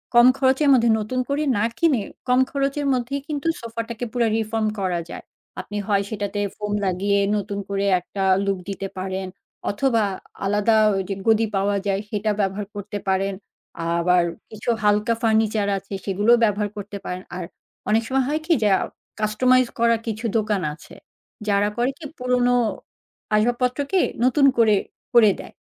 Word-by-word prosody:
কম 240 +1 +8
খরচের 270 +2 +3
মধ্যে 235 -2 +4
নতুন 235 +5 -2
করে 285 +2 0
না 205 - +1
কিনে, 305 -9 +3 0.3
কম 250 0 +4
খরচের 280 +1 -1
মধ্যেই 255 +3 -2
কিন্তু 300 +1 -3
সোফাটাকে 230 +1 -5
পুরা 240 -2 +2
রিফর্ম 220 0 -1
করা 180 -3 0
যায়। - - -8 0.4
আপনি 205 - -7
হয় 200 -2 +2
সেটাতে 205 -1 -3 0.2
ফোম 210 -1 -3
লাগিয়ে 195 +2 +1 0.2
নতুন 200 0 -4
করে 200 0 -1
একটা 195 +2 -5 0.2
লুক 195 -1 0
দিতে 195 0 -4
পারেন, 190 0 -3 0.4
অথবা 230 +1 +1 0.4
আলাদা 210 +3 +2 0.2
ঐ - - 0 0.2
যে 195 - -1
গদি 225 0 +4
পাওয়া 200 +1 +1
যায় 195 0 0
সেটা 210 0 -1
ব্যবহার 200 0 -1
করতে 205 +1 -5
পারেন। 195 +1 +1 0.6
আবার 180 +1 +3 0.3
কিছু 215 +1 -5
হালকা 210 +2 +3
ফার্নিচার 220 -2 +2
আছে, 195 +1 -9
সেগুলোও 205 +5 +3
ব্যবহার 210 -1 +1
করতে 205 0 -6
পারেন। 180 +1 -5
আর 185 - -4 0.5
অনেক 225 +2 +3
সময় 265 +1 +1
হয় 310 +1 -1
কি? 335 - +3
যে, 210 - +4
আ - - -3 0.4
কাস্টমাইজ 250 +4 +3
করা 230 0 +4
কিছু 225 +1 -3
দোকান 210 -3 0
আছে। 155 - -14 0.5
যারা 200 0 +3
করে 245 +3 +1
কি 315 - -9
পুরোনো 250 0 +2 0.8
আসবাবপত্রকে 250 - +1 0.3
নতুন 275 +2 +4
করে 220 -3 +5 0.4
করে 220 -3 +7
দেয়। - - -10
215 Hz, 160 wpm, -23 LUFS, 200-245 Hz, 0.8 s, কম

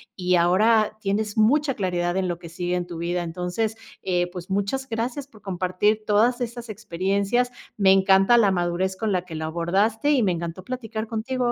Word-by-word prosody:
y 180 -1 +1
ahora, 215 +6 +3
tienes 205 +1 -1
mucha 275 +6 +3
claridad 175 -4 -1
en 190 -1 0
lo 175 -1 -2
que 170 -2 -10
sigue 175 +1 -2
en 175 -1 -2
tu 170 - -7
vida. 175 +1 -2
Entonces, 180 +6 -2 0.3
eh, 175 -1 0
pues, 180 0 -8
muchas 205 +8 -1
gracias 240 +5 -3
por 220 -6 -19
compartir 190 +3 0
todas 230 +4 +2
estas 240 0 -5
experiencias, 200 +4 -1 0.3
me 195 -2 +5
encanta 195 +4 +5
la 205 -4 +4
madurez 180 +1 -1
con 210 +2 -2
la 180 -2 0
que 165 -3 -8
lo 160 0 -3
abordaste, 195 - +1
y 260 -5 +3
me 190 - +2
encantó 170 +1 -5
platicar 225 -1 -5
contigo 240 +2 -1
195 Hz, 190 wpm, -24 LUFS, 180-225 Hz, 0.3 s, me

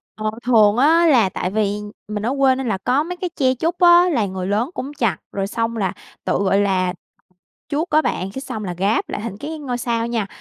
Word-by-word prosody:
Ờ, 215 0 -2
thường 220 -3 +4
á 330 +5 +5
là 235 -10 +4
tại 180 - -3
vì 205 -1 0 0.3
mình 210 0 -4
ở 255 - 0
quê 265 -1 +4
nên 265 -2 -4
là 195 -3 0
có 255 +9 +1
mấy 360 +2 -5
cái 360 -1 -3
tre 260 -3 +2
trúc 335 +7 -2
á, 350 0 +6
là 235 -10 +1
người 185 -1 -4
lớn 215 +7 0
cũng 275 +3 -5
chặt, 230 - +1
rồi 195 -1 -2
xong 230 +1 -2
là 190 -4 -1 0.3
tự, - - +1
gọi 200 0 +2
là, 185 -3 +1 0.8
chuốt 310 +4 -1
á 310 +1 +4
bạn, 190 +2 -2
cái 265 - -4
xong 215 -6 -5
là 180 -2 -4
ráp 200 +4 +1
lại - - -4
thành 215 -4 -5
cái 315 +2 -5
ngôi 250 -4 -4
sao 230 -1 -1
nha. 230 -4 -1
230 Hz, 235 wpm, -20 LUFS, 205-285 Hz, 0.8 s, á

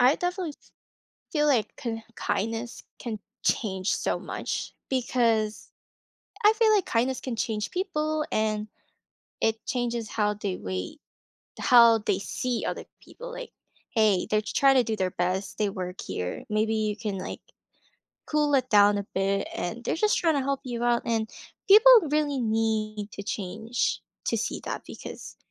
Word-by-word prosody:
I 255 +4 +6
definitely 355 -3 -2
f - - -25 0.6
feel 300 -1 +2
like 250 -7 +2
k 225 -2 -4
kindness 225 +4 -2 0.2
can 225 -3 -5 0.2
change 190 -3 0
so - - 0
much, - - -4 0.2
because 230 -4 +1 0.7
I 420 - +8
feel 440 -1 +4
like 400 -4 +3
kindness 250 +3 0
can 245 -4 -4
change 210 -3 -2
people, 310 -5 -1
and 215 -1 0 0.7
it 220 0 +1
changes 240 -3 -2
how 210 -1 +1
they 200 -3 -3
wait, 90 0 -5 0.6
how 235 -2 +7
they 205 -3 0
see 245 +4 -2
other - - -3 0.2
people, - - -10
like, - - -8 0.4
"Hey, 215 -5 +3
they're 215 0 +2
trying 270 +5 +3
to 255 - +5
do 220 0 -2
their 185 -2 -1
best, 185 +2 -2
they 210 - +2
work 185 -1 -5
here, 90 0 -4
maybe 215 +1 +1
you 215 -1 0
can, 210 -3 -3
like, 185 - -6 0.8
cool 300 -1 +1
it 255 -1 0
down 205 -1 +5
a 200 - -4
bit, 195 +1 +1
and 230 +7 -4
they're - - 0
just 425 +2 +4
trying 325 -3 +2
to 280 - +1
help 275 0 -1
you 240 -2 -4
out." 240 0 +2
And 225 -2 0 0.4
people 435 +5 +9 0.2
really 295 -2 +1
need 215 -2 -1
to 200 - -6
change 215 +4 -2 0.2
to - - +1
see - - -2
that - - -4
because - - -9
225 Hz, 160 wpm, -27 LUFS, 210-270 Hz, 0.8 s, people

